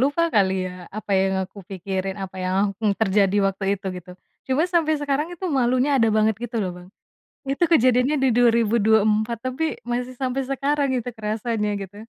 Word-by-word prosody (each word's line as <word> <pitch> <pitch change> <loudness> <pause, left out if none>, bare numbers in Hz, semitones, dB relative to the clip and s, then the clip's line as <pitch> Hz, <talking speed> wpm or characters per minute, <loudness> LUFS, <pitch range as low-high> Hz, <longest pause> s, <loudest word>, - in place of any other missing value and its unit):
lupa 285 +6 +2
kali 195 -3 +4
ya - - -5 0.3
apa 210 -1 -7
yang 190 0 +1
aku 195 +2 -15
pikirin 190 0 -3
apa 190 0 -7
yang 185 - -1 0.2
akan 215 +2 -1
terjadi 200 -1 +2
waktu 195 0 -3
itu 195 - -10
gitu, 180 0 -10 0.4
cuma 265 +4 +1
sampai 315 -2 +3
sekarang 290 +2 -1
itu 360 +2 -8
malunya 255 +3 +2
ada 230 -3 +3
banget 215 0 +3
gitu 240 0 -4
loh 185 - -2
Bang, 180 0 -13 0.6
itu 275 +5 0
kejadiannya 255 0 +4
di - - +4
2024 220 -1 +3
tapi 255 +5 -3 0.3
masih 250 +1 -2
sampai 260 +1 -1
sekarang 280 +1 0
itu 245 0 -4
kerasanya 215 0 -2
gitu. 195 +1 -12
225 Hz, 175 wpm, -23 LUFS, 200-260 Hz, 0.6 s, kali